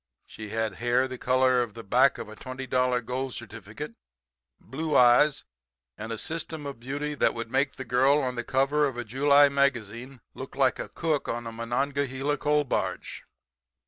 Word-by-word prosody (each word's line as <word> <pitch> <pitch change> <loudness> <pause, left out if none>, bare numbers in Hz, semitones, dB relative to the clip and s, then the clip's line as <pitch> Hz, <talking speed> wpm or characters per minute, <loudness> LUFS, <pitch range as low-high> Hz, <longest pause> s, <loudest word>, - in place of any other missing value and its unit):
She 110 -1 -9
had 110 -2 -2
hair 120 +2 +2
the 130 -1 -8
color 130 0 +3
of 115 -3 -4
the 115 - -8
back 130 +7 +3
of 115 - -7
a 110 - -10
twenty 130 +3 -7
dollar 125 -1 +1
gold 125 +2 -4
certificate, 115 +5 -8 0.7
blue 155 +2 -4
eyes 125 +4 +5 0.5
and 110 +2 -7
a 115 - -3
system 160 +2 -4
of 140 -4 -6
beauty 145 +4 -4
that 145 - +1
would 115 0 -6
make 140 +2 +1
the 130 - -7
girl 130 +4 +3
on 130 -4 -1
the 120 -1 -4
cover 140 +4 +2
of 130 -3 -6
a 120 - -4
July 140 +5 +5
magazine 130 -2 -1
look 130 - -9
like 135 -2 +2
a - - -5
cook 160 -3 -1
on 120 0 -3
a 115 - -5
Monongahela 135 +4 -2
coal 150 0 +2
barge. 135 - -3
130 Hz, 180 wpm, -27 LUFS, 120-140 Hz, 0.7 s, eyes